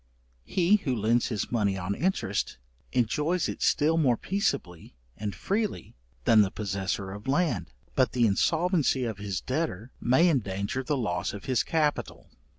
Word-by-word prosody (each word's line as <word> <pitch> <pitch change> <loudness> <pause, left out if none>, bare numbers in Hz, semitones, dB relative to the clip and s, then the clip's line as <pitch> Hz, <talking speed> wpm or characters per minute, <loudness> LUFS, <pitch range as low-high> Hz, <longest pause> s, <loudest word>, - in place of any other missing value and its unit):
He 185 +3 +3
who 140 -11 -2
lends 115 +2 +2
his 110 -5 -3
money 105 -5 +1
on 95 +2 -2
interest, 105 - -1 0.3
enjoys 150 +8 +1
it - - -5
still 160 +3 +3
more 125 -7 +3
peaceably 140 - -2 0.2
and 105 -2 -4
freely 205 - -2 0.3
than 110 -2 +6
the 100 - +2
possessor 95 -1 -3
of 105 +4 -9
land, 165 +5 +1 0.2
but 130 -2 +2
the 120 -2 +3
insolvency 160 - +2
of 110 -3 -4
his 100 -3 -3
debtor 130 - -3
may 130 +9 +4
endanger 100 - 0
the 145 +2 -1
loss 90 -8 -1
of 100 0 -8
his 130 -3 +2
capital. 155 -3 -1
125 Hz, 155 wpm, -28 LUFS, 100-160 Hz, 0.3 s, than